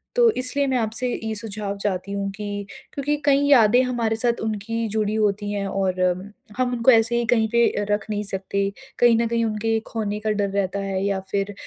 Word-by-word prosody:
तो 480 -1 +6
इसलिए 255 +3 +1
मैं 260 -1 +1
आपसे 225 +2 -1 0.2
ये 220 0 -2
सुझाव 205 -1 -4
चाहती 200 -1 -3
हूँ 200 0 -2
कि 205 0 -5 0.3
क्योंकि 290 +1 -1
कई 280 -1 +4
यादें 245 -3 +6
हमारे 235 -3 0
साथ 235 +1 0
उनकी 225 +1 -2
जुड़ी 215 -1 0
होती 205 -1 0
हैं 200 -1 -2
और 190 -1 -1
अम 180 0 +1 0.3
हम 255 -1 +1
उनको 240 +2 +4
ऐसे 230 0 +4
ही 240 - 0
कहीं 220 -2 +2
पे 235 -2 +2
रख 205 0 0
नहीं 210 -1 -2
सकते। 195 0 -2 0.4
कहीं 240 -1 +5
न 230 0 +1
कहीं 230 0 0
उनके 225 +1 0
खोने 210 -2 -3
का 215 +1 -2
डर 205 -1 0
रहता 200 0 -1
है 195 -1 -2
या 200 -1 0
फिर 200 0 -1
215 Hz, 205 wpm, -23 LUFS, 200-235 Hz, 0.4 s, तो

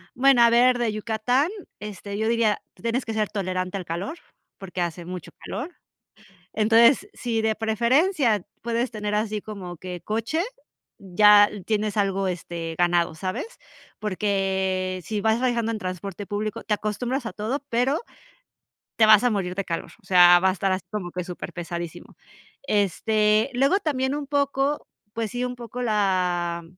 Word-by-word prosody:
Bueno, 265 -1 +5
a 235 - +7
ver, 245 +2 +5
de 235 -2 +1
Yucatán, 225 - 0 0.3
este, 200 0 -6
yo 220 +1 0
diría, 230 -2 +2
tú - - -21
tienes 235 +3 -1
que 225 - -4
ser 215 -1 0
tolerante 185 -1 -2
al 185 - -6
calor, 185 - -4 0.4
porque, 185 -2 -6
hace 175 0 -3
mucho 180 -1 -7
calor. 310 +8 -5 0.8
Entonces, 235 - +4
sí 230 -2 -2
de 220 0 +1
preferencia 235 - +2 0.2
puedes 235 +2 -1
tener 210 -2 -3
así 210 0 -1
como 195 -5 -8
que 180 +1 -7
coche, 225 - -1 0.6
ya 205 +2 +6 0.2
tienes 215 -1 -1
algo, 195 -1 +1
este, 170 -2 -5
ganado, 175 -2 +2
¿sabes? 185 - -4 0.5
Porque, 190 -2 -1
sí 210 +3 -2
vas 220 +2 +2
viajando 235 -3 0
en 220 - -3
transporte 190 +1 -5
público, 210 +1 -3
te 210 - 0
acostumbras 240 +5 -3
a - - -4
todo, 245 +7 -3
pero, 250 +6 +1 1.0
te 220 - +6
vas 215 +1 +7
a 245 - +4
morir 190 -5 -2
de 195 - -1
calor. 170 -2 -4
O - - -26
sea, 175 -1 +7
va 190 - +4
a - - +3
estar 190 +1 -1
así 185 - -3
como 190 -5 -4
que 180 -1 -4
superpesadísimo. 175 -1 -7 0.5
Este, 215 - +2
luego 275 +9 +3
también 265 -7 -1
un 290 -1 -4
poco, 280 0 0 0.3
pues 225 -2 -3
sí, 245 +1 -2
un 250 - -4
poco 240 0 -7
la, 180 -6 0
210 Hz, 160 wpm, -24 LUFS, 185-235 Hz, 1.0 s, a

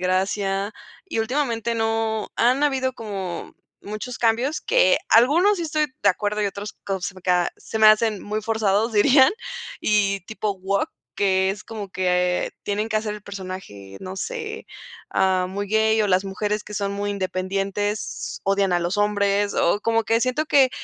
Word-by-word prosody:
gracia. 195 +2 0 0.3
Y 300 -12 -2
últimamente 235 -2 -1
no 225 -1 -1
han 255 +4 +3
habido 260 -2 0
como 195 -5 -6 0.3
muchos 215 +4 -6
cambios 240 +6 +1
que - - +4
algunos 330 - +5
sí - - -2
estoy 305 -1 0 0.2
de 200 - +5
acuerdo, 210 +2 0
y - - +2
otros 200 +1 -5
co 195 -2 -2
se 180 - -4
me 185 - -13
ca 180 -1 +2
se 220 - -6
me 220 - +7
hacen 215 -1 +4
muy 210 +1 -3
forzados, 220 0 +1
dirían 260 +5 +6 0.5
y 200 -2 +2
tipo 215 -2 -3
woke, 195 +1 0 0.3
que 190 -1 +2
es 205 +2 -6
como 210 -4 -7
que 180 -1 +1
tienen 210 +2 -2
que 215 - 0
hacer 215 -1 -1
el 210 - -10
personaje, 185 - -8
no 190 +1 -7
sé, 455 - -5 0.4
ah, 185 -1 +2
muy 200 +2 -4
gay 220 +1 +3
o 210 - +2
las 185 0 +2
mujeres 210 +2 -2
que 210 - -8
son 200 0 -1
muy 205 +1 -2
independientes, 195 +2 -2
odian 195 -1 +2
a 175 - +3
los 175 +3 -1
hombres 205 -1 +1
o 200 +5 +2
como 225 0 +1
que 225 +1 +2
siento 255 +6 0
que 270 -4 +5
205 Hz, 175 wpm, -23 LUFS, 195-225 Hz, 0.5 s, me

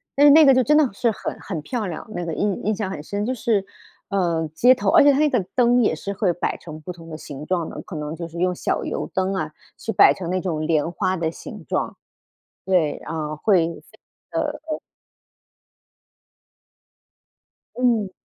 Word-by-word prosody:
但 285 - +5
是 - - +9
那 310 +1 +8
个 270 - +7
就 255 0 +4
真 300 +4 +4
的 300 -4 +4
是 230 +3 +1
很 210 - -5
很 170 -6 -5
漂 220 - -3
亮， 165 -3 -6
那 175 - -3
个 165 - -3
印 200 +2 -1
印 215 - +2
象 205 -2 -3
很 150 -6 -6
深， 200 +5 -3
就 255 - -1
是， 225 -5 0 0.5
呃， 170 -4 0
街 250 +7 +6
头 255 - 0
而 330 -2 +7
且 285 - +7
它 270 - +1
那 305 0 +4
个 245 -6 +1
灯 245 -1 +4
也 - - +2
是 200 - -5
会 195 -3 +1
摆 175 - -2
成 155 -2 -10
不 165 - -6
同 165 -1 -13
的 155 - -6
形 145 -1 -8
状 170 -1 -1
的， - - -7
可 - - -9
能 150 +1 -4
就 170 0 -6
是 170 +1 -8
用 180 0 +1
小 - - -1
油 - - -3
灯 190 +1 0
啊， 155 -4 -2 0.3
去 225 - -4
摆 - - +7
成 175 -3 -6
那 185 0 0
种 160 -4 -2
莲 160 0 +1
花 185 +1 -1
的 165 -2 -1
形 - - -10
状。 - - -2 0.7
对， 180 -6 +2
呃， 155 -2 -3
会 175 0 +3
非 170 - -10 0.3
常 330 - -1
地， 295 -1 -4
呃 310 - -2 3.0
嗯。 230 -6 +1
190 Hz, 225 characters per minute, -22 LUFS, 165-240 Hz, 3.0 s, 是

